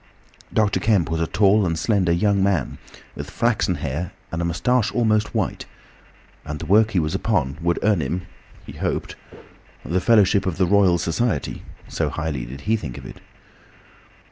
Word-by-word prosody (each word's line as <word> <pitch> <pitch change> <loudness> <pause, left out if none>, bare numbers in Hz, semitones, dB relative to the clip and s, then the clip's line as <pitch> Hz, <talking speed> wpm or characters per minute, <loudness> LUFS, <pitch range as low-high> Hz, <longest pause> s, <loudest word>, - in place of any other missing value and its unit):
Dr. 105 -2 +1
Kemp 100 -7 +1
was 80 0 -1
a 80 - 0
tall 105 +3 +3
and 85 -3 -1
slender 95 -3 +1
young 100 +3 +2
man, 95 -2 0 0.3
with - - -7
flaxen 115 -6 0
hair 80 +4 -4 0.2
and 85 - -2
a - - -1
moustache 105 +8 +1
almost 110 -3 +1
white, - - -2 0.8
and 75 - -5
the - - -7
work 110 +3 +4
he 100 -5 +1
was 80 -1 -1
upon 75 - -1
would 85 +1 +1
earn 105 -5 +3
him, 85 +6 -3 0.4
he - - -9
hoped, - - -3 0.7
the 90 +2 0
fellowship 100 -3 +4
of 90 - -2
the 95 - +3
Royal 95 -1 +4
Society, 85 - -1 0.3
so - - -2
highly 80 -6 -3
did 70 +3 -9
he 110 +8 +1
think 75 - -6
of - - -10
it. - - -10
90 Hz, 170 wpm, -22 LUFS, 80-105 Hz, 0.8 s, work